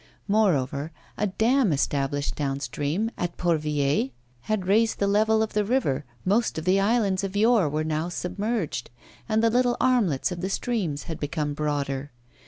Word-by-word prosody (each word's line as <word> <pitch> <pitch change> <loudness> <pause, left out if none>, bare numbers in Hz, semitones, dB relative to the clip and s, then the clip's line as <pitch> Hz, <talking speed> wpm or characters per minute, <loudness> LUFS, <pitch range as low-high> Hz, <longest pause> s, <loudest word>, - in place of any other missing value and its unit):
Moreover, 160 -8 +1 0.2
a 210 - 0
dam 225 +3 +2
established 140 0 0
down 140 -2 -2
stream 155 +10 -2
at 175 -1 -3
Port 170 -3 +1
Villez 145 -3 +1 0.4
had 215 -4 0
raised 220 +4 +3
the 200 - +1
level 220 +2 +3
of 220 - -4
the 210 - +2
river, 195 - 0 0.2
most 215 +2 +1
of 160 - -4
the 185 +2 +4
islands 200 -2 +2
of 195 0 -4
yore 215 -6 +4
were 155 +2 -1
now 155 +2 -1
submerged, 185 - -3 0.4
and 220 +1 +2
the 230 - +4
little 245 0 +2
armlets 210 - +2
of 175 -1 -5
the 190 - -2
stream 195 -8 -1
had 165 -2 -6
become 145 0 -2
broader. 145 -2 -2
185 Hz, 170 wpm, -25 LUFS, 145-220 Hz, 0.4 s, the